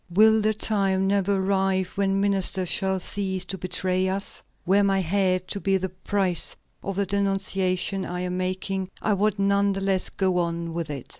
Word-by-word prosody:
Will 220 +4 +5
the 215 +1 +1
time 195 -3 0
never 200 0 +1
arrive 190 -1 +1
when 195 0 0
ministers 195 -2 +2
shall 190 -1 +2
cease 190 -1 -1
to 190 - -4
betray 185 +1 0
us? 195 +1 -2 0.2
Were 195 +3 +4
my 195 -1 +2
head 185 0 0
to 200 - -3
be 195 0 +1
the 190 0 -3
price 185 -1 0 0.3
of 195 - -4
the 200 +1 0
denunciation 195 -1 0
I 180 0 -4
am 180 0 -3
making, 185 +1 -2
I 215 - +1
would 205 +1 +1
none 200 0 +2
the 195 - -4
less 195 -1 +1
go 185 -2 0
on 170 -1 -2
with 165 -2 -3
it." 140 -4 -5
190 Hz, 180 wpm, -25 LUFS, 185-200 Hz, 0.3 s, Will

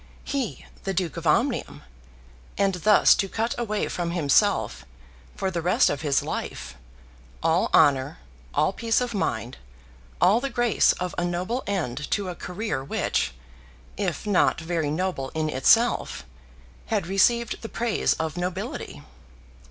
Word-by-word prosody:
He, 270 -6 -3 0.2
the 195 -1 -2
Duke 175 -3 -1
of 170 -1 -4
Omnium, 240 - 0 0.7
and 195 -1 +2
thus 205 +4 +5
to 195 - -1
cut 225 +3 -1
away 215 -3 -2
from 175 -1 -3
himself, 160 -6 +2 0.5
for 190 - -2
the 170 -2 -2
rest 180 +3 +3
of 145 - -3
his 145 -3 +1
life, - - -5 0.7
all 165 +2 +2
honour, 135 - +4 0.3
all 155 - +1
peace 225 +1 +1
of 245 -1 -2
mind, 120 - -2 0.6
all 220 - +5
the 275 - -2
grace 240 -3 +3
of 180 0 -4
a - - 0
noble 180 +9 -2
end 150 -9 -2
to 200 -3 -1
a 180 - -5
career 180 -7 -4
which, - - -1 0.6
if - - -3
not 205 -3 +2
very 160 -2 -2
noble 155 -4 -2
in 155 -1 -1
itself, 225 - +2 0.6
had 210 -6 0
received 225 +5 +2
the 225 - -6
praise 235 -2 0
of 160 +1 -4
nobility! 180 +1 -4
180 Hz, 145 wpm, -25 LUFS, 160-215 Hz, 0.7 s, thus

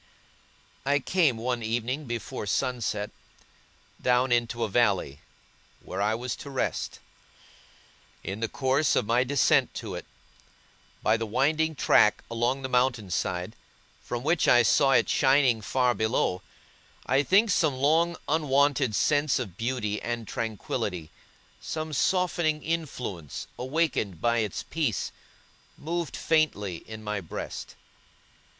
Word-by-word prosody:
I 140 +1 +2
came, 145 -3 +2
one 120 +1 -2
evening 120 +6 -2
before 115 -3 -5
sunset, 115 -4 -1 0.9
down 125 +1 +2
into 120 -1 +1
a - - +1
valley, 100 - +1 0.6
where 95 - -4
I 105 +2 +2
was 125 +1 -3
to 140 - -9
rest. 135 -2 -2 1.3
In 95 +3 -5
the 115 - -1
course 140 +2 +1
of - - +2
my 120 +3 +3
descent 135 0 +2
to - - -5
it, - - -7 1.0
by 110 +1 +3
the 115 0 -3
winding 155 +7 +1
track 105 -5 +4
along 120 +4 0
the - - -1
mountain 125 -6 +1
side, 90 +5 -2 0.5
from 120 0 -5
which 160 +2 +2
I 120 -1 +6
saw 135 +6 +4
it - - +4
shining 130 -4 +3
far 125 +3 +1
below, 110 -5 0 0.6
I 135 +1 +3
think 200 +8 +4
some 155 -6 +2
long 160 +5 +2
unwonted 145 -5 +2
sense 145 +3 +2
of 105 -9 -5
beauty 115 -2 -2
and 120 -2 -4
tranquillity, 90 -6 -3 0.5
some 155 -1 -4
softening 170 -1 +1
influence 125 - -4
awakened 130 - -1
by 120 +4 +2
its 105 -4 -2
peace, 150 - -2 0.7
moved 170 -2 -3
faintly 105 - +1
in 110 0 -8
my 105 -1 -3
breast. 85 - -7
125 Hz, 130 wpm, -27 LUFS, 110-145 Hz, 1.3 s, I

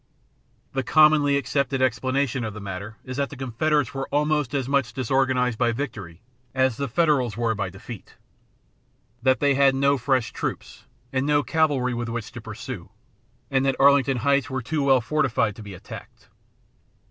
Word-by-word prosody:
The 135 - 0
commonly 150 +1 +4
accepted 140 -1 -1
explanation 130 0 0
of 110 -2 -5
the - - -6
matter 100 +2 -7
is 130 0 -6
that 140 -1 0
the - - -9
Confederates 135 +2 0
were 135 0 -4
"almost 150 -1 0
as 135 -3 -1
much 140 -3 0
disorganized 130 -2 +1
by 120 -1 +3
victory 115 - -6 0.3
as 130 -2 +2
the 140 - -2
Federals 130 -6 +1
were 115 -1 +1
by 100 -3 -3
defeat;" 100 +3 -11 1.1
that 130 +1 +3
they 140 -1 +3
had 135 0 +4
no 140 0 +2
fresh 125 -3 0
troops - - -5 0.3
and 130 +2 0
no 145 -1 +3
cavalry 135 -3 +1
with 120 0 -3
which 115 -2 -5
to - - -8
pursue, - - -8 0.6
and 135 -1 +2
that 135 -1 0
Arlington 140 -1 +5
Heights 140 +3 +1
were 130 -2 -3
too 150 +5 -1
well 135 -2 +4
fortified 120 -5 0
to - - -9
be 100 -2 -9
attacked. - - -12
130 Hz, 170 wpm, -24 LUFS, 120-140 Hz, 1.1 s, Arlington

